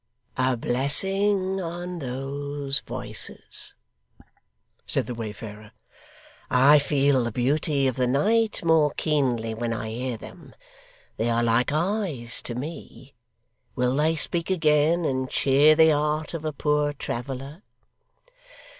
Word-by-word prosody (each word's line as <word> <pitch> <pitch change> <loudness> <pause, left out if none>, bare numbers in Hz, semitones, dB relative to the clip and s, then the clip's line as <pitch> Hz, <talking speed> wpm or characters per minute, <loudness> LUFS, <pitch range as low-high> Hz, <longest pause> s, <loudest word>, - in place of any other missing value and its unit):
'A 130 -1 +1
blessing 190 - +1
on 175 +1 -5
those 140 +1 -3
voices!' - - -4 1.1
said - - +1
the 125 - -5
wayfarer. 110 -1 -8 0.8
'I 140 +4 +6
feel 140 -2 +2
the 120 - -2
beauty 140 +4 +1
of 130 - -2
the 125 -1 +1
night 215 - +1
more 160 -2 +4
keenly, 125 -7 0
when 115 +1 -3
I 110 0 -4
hear 125 +1 -3
them. - - -13 0.6
They 115 +2 0
are 115 0 +1
like 120 +3 +2
eyes 160 - -1
to 120 - -3
me. 150 +7 -8 0.6
Will 125 +1 +1
they 155 +3 +2
speak 165 +4 -1
again, 160 -1 +3
and 130 -2 -1
cheer 145 +3 +4
the 160 0 +6
heart 150 +2 -1
of 160 -2 -5
a 155 - -1
poor 150 0 0
traveller? 135 +4 -6
140 Hz, 125 wpm, -25 LUFS, 125-160 Hz, 1.1 s, I